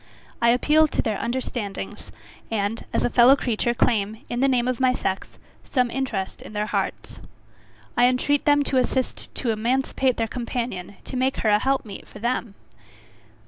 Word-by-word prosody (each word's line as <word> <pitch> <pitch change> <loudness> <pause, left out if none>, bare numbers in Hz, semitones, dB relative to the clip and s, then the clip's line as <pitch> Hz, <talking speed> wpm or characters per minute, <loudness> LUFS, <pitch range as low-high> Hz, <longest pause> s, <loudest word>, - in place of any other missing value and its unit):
I 235 - +5
appeal 300 +6 +4
to - - -1
their 215 -4 -1
understandings; 210 - -4 0.4
and, 220 +1 -1
as - - +1
a - - +2
fellow 250 +3 +7
creature 240 -2 -1
claim, 220 0 0
in 240 - -2
the 270 - +4
name 250 -2 +2
of 255 -2 -1
my 255 -1 +4
sex, 190 -6 -3 0.3
some 250 -3 0
interest 230 -8 -3
in - - -10
their 210 0 -1
hearts. - - -3 0.8
I 245 0 +5
entreat 265 +3 +1
them 290 -1 +4
to 275 - 0
assist 255 0 -1
to 240 - 0
emancipate 255 +3 0
their 225 - 0
companion 235 -5 -4
to - - -7
make 260 +1 +1
her - - +5
a 210 0 +5
help 270 +1 0
meet 205 - -9
for - - -12
them! 235 -2 -2
240 Hz, 175 wpm, -24 LUFS, 215-260 Hz, 0.8 s, fellow